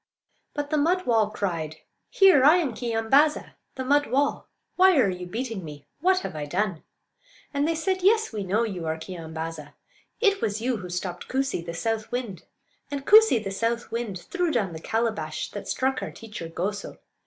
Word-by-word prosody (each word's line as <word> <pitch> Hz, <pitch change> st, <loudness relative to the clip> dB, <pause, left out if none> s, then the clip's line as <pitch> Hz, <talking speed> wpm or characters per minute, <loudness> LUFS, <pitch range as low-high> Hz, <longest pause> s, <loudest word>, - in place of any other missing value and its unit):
But 290 Hz, 0 st, -3 dB
the 305 Hz, -, +2 dB
mud 360 Hz, +5 st, +1 dB
wall 220 Hz, -3 st, +3 dB
cried: 170 Hz, -7 st, -3 dB, 0.3 s
"Here! 380 Hz, -9 st, +6 dB
I 300 Hz, +5 st, +8 dB
am 320 Hz, -9 st, 0 dB
Keeyambaa'za, 240 Hz, +6 st, +2 dB, 0.2 s
the 260 Hz, -, -4 dB
mud 290 Hz, +2 st, +3 dB
wall. 280 Hz, +2 st, 0 dB, 0.3 s
Why 375 Hz, -2 st, +6 dB
are 215 Hz, -8 st, +4 dB
you 180 Hz, 0 st, -6 dB
beating 225 Hz, -1 st, -4 dB
me? 150 Hz, -2 st, -10 dB
What 370 Hz, +3 st, +3 dB
have -, -, -6 dB
I 150 Hz, -1 st, -3 dB
done?" 185 Hz, +1 st, -1 dB, 0.7 s
And 285 Hz, +1 st, +1 dB
they 330 Hz, -, +1 dB
said: 375 Hz, +3 st, -1 dB
"Yes, 440 Hz, +4 st, +3 dB
we 210 Hz, -2 st, -3 dB
know 200 Hz, +5 st, +1 dB
you 185 Hz, -7 st, -4 dB
are 160 Hz, 0 st, -1 dB
Keeyambaaza; 160 Hz, -3 st, -7 dB, 0.5 s
it 400 Hz, -3 st, +3 dB
was 210 Hz, 0 st, -1 dB
you 245 Hz, +1 st, 0 dB
who 185 Hz, -3 st, -8 dB
stopped 180 Hz, 0 st, -4 dB
Koosee, 265 Hz, -9 st, -1 dB
the 170 Hz, 0 st, -6 dB
south 220 Hz, +5 st, -2 dB
wind; 240 Hz, -7 st, -4 dB, 0.5 s
and 280 Hz, -1 st, -5 dB
Koosee, 430 Hz, -, +7 dB
the 195 Hz, -, -4 dB
south 230 Hz, +4 st, -2 dB
wind, 230 Hz, -5 st, -3 dB
threw 355 Hz, -, -2 dB
down 210 Hz, -, 0 dB
the 160 Hz, -, -6 dB
calabash 220 Hz, -10 st, -2 dB
that 205 Hz, -, -7 dB
struck 265 Hz, 0 st, 0 dB
our -, -, -4 dB
teacher 210 Hz, -7 st, -8 dB
Goso. 200 Hz, +5 st, -4 dB
225 Hz, 185 wpm, -26 LUFS, 180-285 Hz, 0.7 s, I